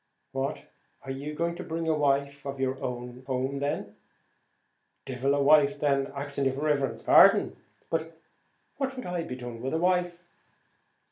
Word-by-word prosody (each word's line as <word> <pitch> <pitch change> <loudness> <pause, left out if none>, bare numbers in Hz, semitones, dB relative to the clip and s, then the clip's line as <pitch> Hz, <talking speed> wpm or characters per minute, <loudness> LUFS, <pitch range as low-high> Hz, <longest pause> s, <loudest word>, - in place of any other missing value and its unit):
"What! 135 +2 -3 0.4
are 135 - -5
you 145 +3 -5
going 170 +2 0
to - - -7
bring 165 0 -3
a 160 - +3
wife 140 -1 +1
of 140 0 -5
your 130 0 -1
own 125 0 -5
home 130 +1 -1
then?" 140 +1 -3 1.1
"Devil 135 +2 0
a 140 - +2
wife, 145 -1 +5
then, 140 -2 +1
axing 140 0 -3
your 135 0 +1
riverence's 140 -2 -1
pardon. - - +6 0.4
What'd 165 - -6
I 175 -1 -2
be 165 -6 -5
doing 120 -2 -7
with 135 +5 -2
a - - +2
wife?" 175 0 0
140 Hz, 150 wpm, -28 LUFS, 135-160 Hz, 1.1 s, pardon